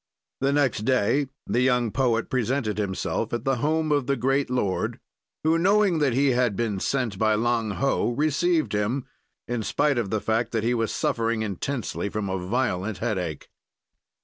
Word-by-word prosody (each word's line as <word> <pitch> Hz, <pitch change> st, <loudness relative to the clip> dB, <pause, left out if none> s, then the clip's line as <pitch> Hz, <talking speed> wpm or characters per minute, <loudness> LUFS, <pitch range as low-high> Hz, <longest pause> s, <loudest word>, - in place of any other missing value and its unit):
"The 135 Hz, +1 st, +1 dB
next 140 Hz, -5 st, +2 dB
day 130 Hz, +4 st, +2 dB, 0.2 s
the 120 Hz, -, +1 dB
young 125 Hz, -3 st, +2 dB
poet 120 Hz, -3 st, +1 dB
presented 125 Hz, -3 st, -1 dB
himself 105 Hz, +3 st, -2 dB
at 120 Hz, -1 st, -2 dB
the 135 Hz, -1 st, +1 dB
home 155 Hz, +4 st, 0 dB
of 145 Hz, -3 st, +1 dB
the 140 Hz, -, +2 dB
great 135 Hz, +2 st, +1 dB
lord, 105 Hz, -7 st, -1 dB, 0.4 s
who, 160 Hz, +1 st, +3 dB
knowing 195 Hz, -1 st, +3 dB
that 140 Hz, -5 st, +2 dB
he 140 Hz, +3 st, +3 dB
had 120 Hz, -4 st, +1 dB
been 105 Hz, -3 st, -1 dB
sent 115 Hz, -4 st, -1 dB
by 110 Hz, -1 st, +3 dB
Lang 115 Hz, 0 st, 0 dB
Ho, 135 Hz, -3 st, +1 dB
received 155 Hz, -, +1 dB
him 105 Hz, +6 st, -1 dB, 0.4 s
in 120 Hz, -1 st, -2 dB
spite 140 Hz, +4 st, +1 dB
of 105 Hz, -5 st, -2 dB
the 110 Hz, -, 0 dB
fact 110 Hz, +3 st, -1 dB
that 110 Hz, -2 st, 0 dB
he 120 Hz, +2 st, +2 dB
was 115 Hz, -2 st, 0 dB
suffering 115 Hz, -1 st, 0 dB
intensely 110 Hz, +2 st, -3 dB
from 105 Hz, -1 st, -3 dB
a 95 Hz, -1 st, -2 dB
violent 105 Hz, -2 st, -1 dB
headache. 90 Hz, -, -3 dB
120 Hz, 175 wpm, -25 LUFS, 110-140 Hz, 0.4 s, who